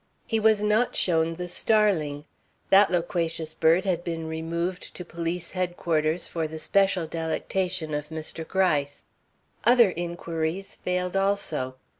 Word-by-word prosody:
He 225 Hz, -, 0 dB
was 215 Hz, -1 st, +3 dB
not 215 Hz, +3 st, +2 dB
shown 165 Hz, -2 st, +2 dB
the 180 Hz, +1 st, -5 dB
starling. 175 Hz, -7 st, +1 dB, 0.5 s
That 195 Hz, +1 st, +7 dB
loquacious 165 Hz, -2 st, -1 dB
bird 165 Hz, +4 st, +3 dB
had 175 Hz, -3 st, 0 dB
been 165 Hz, -2 st, -4 dB
removed 170 Hz, +3 st, -3 dB
to 180 Hz, -, -7 dB
police 170 Hz, +1 st, -4 dB
headquarters 170 Hz, -3 st, 0 dB
for 165 Hz, -2 st, -3 dB
the 160 Hz, +1 st, -7 dB
special 190 Hz, +1 st, +2 dB
delectation 165 Hz, +1 st, -2 dB
of 150 Hz, 0 st, -3 dB
Mr. 160 Hz, 0 st, -5 dB
Gryce. 150 Hz, -7 st, 0 dB, 0.6 s
Other 235 Hz, -4 st, +6 dB
inquiries 170 Hz, +1 st, -3 dB
failed 180 Hz, 0 st, -2 dB
also. 195 Hz, -10 st, 0 dB
170 Hz, 130 wpm, -26 LUFS, 160-190 Hz, 0.6 s, That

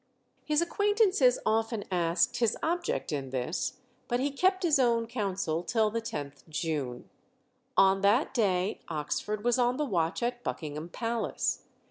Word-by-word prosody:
His 305 Hz, +2 st, +2 dB
acquaintances 405 Hz, -, +3 dB
often 225 Hz, 0 st, +1 dB
asked 175 Hz, +7 st, +1 dB
his 235 Hz, -3 st, +1 dB
object 345 Hz, -, -1 dB
in 140 Hz, -3 st, -3 dB
this, 130 Hz, +6 st, -2 dB, 0.3 s
but 245 Hz, -, 0 dB
he 280 Hz, +2 st, 0 dB
kept 375 Hz, +7 st, +2 dB
his 310 Hz, -5 st, +4 dB
own 235 Hz, -2 st, +3 dB
counsel 195 Hz, -8 st, -2 dB
till 215 Hz, +5 st, +1 dB
the 230 Hz, +1 st, -2 dB
10th 145 Hz, -11 st, -6 dB
June. 150 Hz, -6 st, -3 dB, 0.7 s
On 195 Hz, 0 st, +5 dB
that 210 Hz, +8 st, +3 dB
day 195 Hz, -5 st, +1 dB
Oxford 170 Hz, +7 st, -3 dB
was 245 Hz, +1 st, +2 dB
on 245 Hz, +1 st, +2 dB
the 300 Hz, -, 0 dB
watch 175 Hz, -, 0 dB
at 245 Hz, 0 st, -2 dB
Buckingham 155 Hz, +1 st, -4 dB
Palace. 230 Hz, +4 st, -2 dB
220 Hz, 145 wpm, -29 LUFS, 170-250 Hz, 0.7 s, On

